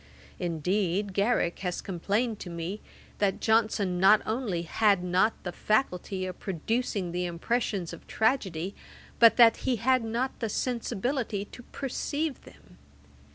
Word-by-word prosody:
Indeed 185 +3 -1
Garrick 200 -3 +1
has 180 -2 -3
complained 205 +5 -1
to 180 - -7
me, 170 +5 -5 0.4
that 200 -2 +1
Johnson 215 -5 +2
not 195 +3 +6
only 215 -7 -2
had 200 +2 +2
not 185 +5 +2
the 180 - -3
faculty 190 -3 0
of 185 -1 -6
producing 195 0 -2
the 180 +1 -1
impressions 185 +1 -2
of - - -11
tragedy, 200 -7 0 0.5
but 230 -1 +7
that 235 -2 +7
he 255 - 0
had 255 +2 +2
not 235 +4 -1
the 225 - -2
sensibility 235 -2 -2
to 245 - -12
perceive 280 +3 -3
them. - - -18
205 Hz, 135 wpm, -28 LUFS, 180-235 Hz, 0.5 s, but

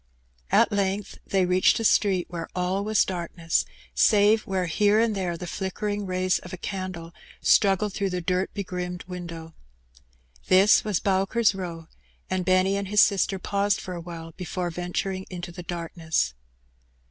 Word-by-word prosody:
At - - +4
length 200 0 -1
they 190 -2 +2
reached 180 +4 +3
a - - -2
street 195 -4 +3
where 170 -2 -6
all 185 +2 0
was 215 0 +3
darkness, 170 -2 -1 0.3
save 215 +1 +4
where 190 -2 0
here 205 +5 +3
and 225 -1 +2
there 180 -4 -2
the 180 - -6
flickering 205 +3 -3
jays 185 -2 +1
of 180 - -11
a 185 - -6
candle 185 -4 -5 0.3
struggled 200 0 +3
through 200 -1 -1
the 180 -1 -2
dirt 180 +2 -1
begrimed 180 -2 -4
window. 170 -3 -8 0.9
This 190 +3 +6
was 210 -5 0
Bowker's 195 +4 +2
Eow, 170 -4 -6 0.4
and 185 -1 -1
Benny 185 +1 +3
and 200 -1 -3
his 210 +1 +6
sister 195 -1 +1
paused 200 +1 0
for 185 - -6
awhile 170 -1 -7
before 180 0 -4
venturing 180 +2 -3
into 175 -1 -6
the 180 +1 -8
darkness. 165 - -2
185 Hz, 155 wpm, -25 LUFS, 175-200 Hz, 0.9 s, This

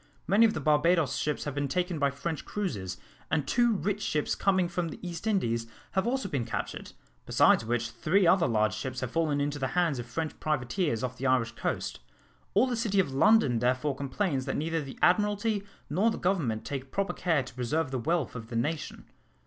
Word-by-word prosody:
Many 210 +5 +5
of 215 - -2
the - - -1
Barbados 155 +2 +3
ships 150 -1 -1
have 145 - -4
been 145 0 -1
taken 175 +3 -1
by 140 -1 +3
French 150 +3 -4
cruisers, 100 - -3 0.3
and 150 -4 0
two 240 - +3
rich 205 +1 -1
ships 150 -7 0
coming 190 -2 +2
from 175 0 -2
the - - -8
East 175 +4 -5
Indies 115 - 0 0.2
have 190 +3 0
also 260 -3 0
been 140 -9 -1
captured, 115 - -5 0.3
besides - - +5
which 115 0 -1
three 155 - +2
other 170 0 +5
large 110 -4 +2
ships 130 - -4
have 130 - -3
fallen 155 -3 +1
into 145 0 -1
the 135 - 0
hands 165 -7 +2
of 120 - -6
French 155 +6 -4
privateers 150 - -1
off 125 0 -3
the 135 - -1
Irish 125 -3 +2
coast. 115 - -3 0.6
All - - +6
the 250 -2 -1
city 220 -4 +1
of 140 -8 +1
London 140 - +4
therefore 130 +4 +1
complains 140 0 -1
that 135 - -2
neither 165 +2 -1
the 135 -2 -8
Admiralty 205 +2 +2 0.2
nor 190 +10 +2
the 225 - -2
Government 155 - 0
take 135 -1 -5
proper 195 +6 -1
care 165 -6 +1
to 125 - -11
preserve 130 +4 -1
the 130 - -1
wealth 160 +3 0
of 115 -2 -6
of - - -20
the 120 - -6
nation." 150 +7 -2
150 Hz, 205 wpm, -29 LUFS, 130-185 Hz, 0.6 s, All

